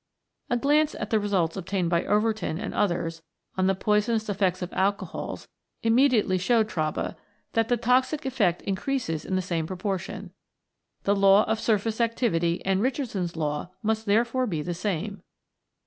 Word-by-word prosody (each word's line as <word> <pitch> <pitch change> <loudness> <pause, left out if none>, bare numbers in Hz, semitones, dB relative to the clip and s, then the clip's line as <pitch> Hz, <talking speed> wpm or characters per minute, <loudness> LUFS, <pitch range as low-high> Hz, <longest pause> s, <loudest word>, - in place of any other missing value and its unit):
A 245 - +2
glance 295 +4 +2
at 215 - -5
the 220 - +4
results 190 -6 0
obtained 185 -2 -2
by 170 -1 +2
Overton 210 -5 +1
and 205 - -4
others 165 -4 -1 0.3
on 185 0 +2
the 195 - +2
poisonous 215 +2 +1
effects 190 -2 0
of 180 - -6
alcohols 200 +1 -2 0.4
immediately 225 -5 +3
showed 220 +3 +3
Traube 155 -7 -2 0.4
that 225 -1 +2
the 245 - +2
toxic 255 +5 +1
effect 205 -10 +1
increases 195 - -2
in 190 - -1
the 185 - 0
same 165 -3 -2
proportion. 190 0 -4 0.7
The 200 - +2
law 195 +1 +6
of 220 0 -1
surface 220 +1 0
activity 190 -8 0
and 190 0 +2
Richardson's 220 - -2
Law 150 +1 -2
must 220 0 0
therefore 235 +5 +2
be 160 -7 -2
the 175 - -3
same. 195 +2 -3
205 Hz, 155 wpm, -26 LUFS, 180-225 Hz, 0.7 s, law